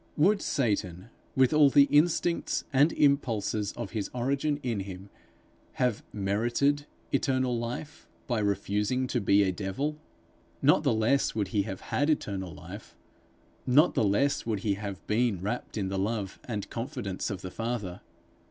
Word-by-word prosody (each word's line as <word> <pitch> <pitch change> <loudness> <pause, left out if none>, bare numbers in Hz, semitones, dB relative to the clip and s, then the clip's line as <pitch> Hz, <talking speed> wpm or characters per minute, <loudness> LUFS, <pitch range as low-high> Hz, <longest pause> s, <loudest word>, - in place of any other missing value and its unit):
Would 195 +7 +4
Satan, 100 - -1 0.2
with 130 +2 +4
all 150 -2 +6
the 140 +1 +7
instincts 155 +4 +2
and 145 +5 +5
impulses 115 -7 +1
of 120 -5 -6
his 110 -4 -3
origin 140 +4 0
in 120 -5 -1
him, 95 0 -8 0.6
have 125 -4 0
merited 120 +9 0 0.2
eternal 130 -2 +1
life 120 +6 -5 0.2
by 120 -3 0
refusing 105 +4 0
to 125 -1 -1
be 100 +1 +4
a 95 - +1
devil? 105 - -3 0.6
Not - - +4
the - - +2
less 115 +5 +2
would 105 -4 -1
he 100 +1 +1
have 95 - -6
had 145 +3 0
eternal 95 - -1
life; 90 +7 -10 0.7
not 145 +7 +5
the - - +2
less 110 +8 +2
would 110 -4 -2
he 105 -1 +1
have 100 -1 -6
been 110 -3 +1
wrapt 105 +5 -4
in 95 -3 -1
the 95 0 -2
love 100 -1 -2
and 105 -4 -4
confidence 100 -5 -4
of 100 -3 -5
the 90 - -6
Father. 115 -6 -4
115 Hz, 155 wpm, -28 LUFS, 100-135 Hz, 0.7 s, the